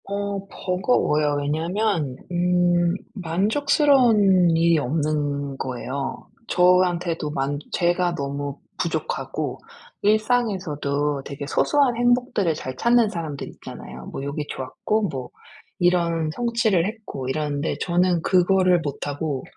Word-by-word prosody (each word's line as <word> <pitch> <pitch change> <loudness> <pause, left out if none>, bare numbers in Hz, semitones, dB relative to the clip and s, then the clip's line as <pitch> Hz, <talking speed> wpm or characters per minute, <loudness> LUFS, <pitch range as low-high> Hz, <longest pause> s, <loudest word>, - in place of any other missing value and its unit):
어 200 0 -3
버거워요. 180 - +1
왜냐면 165 0 -1 0.2
음 175 0 +2 0.2
만족스러운 210 - +3
일이 165 0 +4
없는 145 -1 -1
거예요. 130 +2 -4 0.2
저한테도 180 -3 +2
만 140 0 -2
제가 175 0 +1
너무 140 0 -4 0.2
부족하고 - - -3 0.4
일상에서도 185 - 0
되게 140 +1 -6
소소한 275 - +2
행복들을 245 -8 +2
잘 130 -3 -6
찾는 235 - +3
사람들이 160 -8 -5
있잖아요. 65 0 -10
뭐 135 - -6
요게 140 +1 -3
좋았고 205 +11 -2
뭐 130 -4 -5 0.5
이런 170 -3 +1
성취를 230 -4 +1
했고 215 - -6
이러는데 145 +1 -2
저는 175 -1 +2
그거를 185 -1 +3
못하고 145 0 -3
175 Hz, 260 characters per minute, -23 LUFS, 145-200 Hz, 0.5 s, 일이